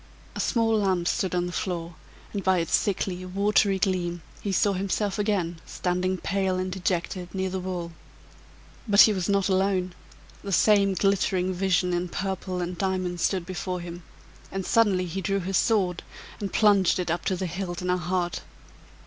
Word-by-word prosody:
A - - -6
small 225 -3 +2
lamp 185 -4 +1
stood 190 -4 0
on 175 0 +1
the 175 - -4
floor, 175 -2 -3 0.4
and 200 -2 -3
by 190 -1 +3
its 165 -2 -2
sickly, 185 -2 -1
watery 200 +1 +2
gleam, 175 -3 -1 0.2
he 200 - -2
saw 200 +1 +2
himself 195 +2 -1
again 180 -6 -1
standing, 185 +1 -1
pale 190 +1 0
and 185 0 -2
dejected, 180 0 -2
near 190 -1 -1
the 190 - -2
wall. 180 -2 -4 1.0
But 200 -1 +7
he 215 - +7
was 185 -2 -2
not 200 -1 +2
alone; 190 -1 +1 0.5
the 200 - -5
same 200 0 +4
glittering 185 -1 +1
vision 180 -1 +1
in 175 0 -1
purple 190 0 -3
and 175 +1 -3
diamonds 185 -2 -1
stood 185 -1 +1
before 185 0 -4
him, 175 0 -7 0.5
and 195 -1 -3
suddenly 200 -5 +3
he 180 +3 -4
drew 195 +3 0
his 190 0 0
sword 190 -6 +1 0.4
and 200 -2 -4
plunged 200 -4 +4
it 180 -3 -1
up 170 0 -2
to 190 - +1
the 185 - -3
hilt 180 0 -4
in 180 - -2
her 180 - +2
heart! 175 0 -2
185 Hz, 175 wpm, -26 LUFS, 180-195 Hz, 1.0 s, But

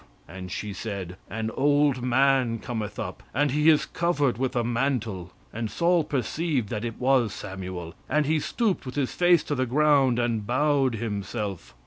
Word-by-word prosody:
And 90 0 -8
she 105 +2 -4
said, 95 -4 -5
An 110 0 -3
old 145 -1 +2
man 125 -1 +2
cometh 110 -3 -5
up; - - -5
and 145 +1 +2
he 150 +3 +4
is 155 -2 +4
covered 145 -8 0
with 130 -1 -1
a 120 - +1
mantle. 115 -7 -1 0.2
And 115 0 -3
Saul 170 +3 +2
perceived 145 -3 -1
that 110 -1 -3
it 115 -2 -4
was 125 -4 +3
Samuel, 95 -4 -6 0.2
and 150 0 +2
he 155 +2 +2
stooped 200 - -1
with 125 - -6
his 140 -3 -1
face 175 -3 +4
to 150 - -3
the 130 -2 0
ground, 140 -2 +3
and 115 -4 -1
bowed 135 -1 +2
himself." 105 - -4
125 Hz, 170 wpm, -26 LUFS, 110-145 Hz, 0.2 s, he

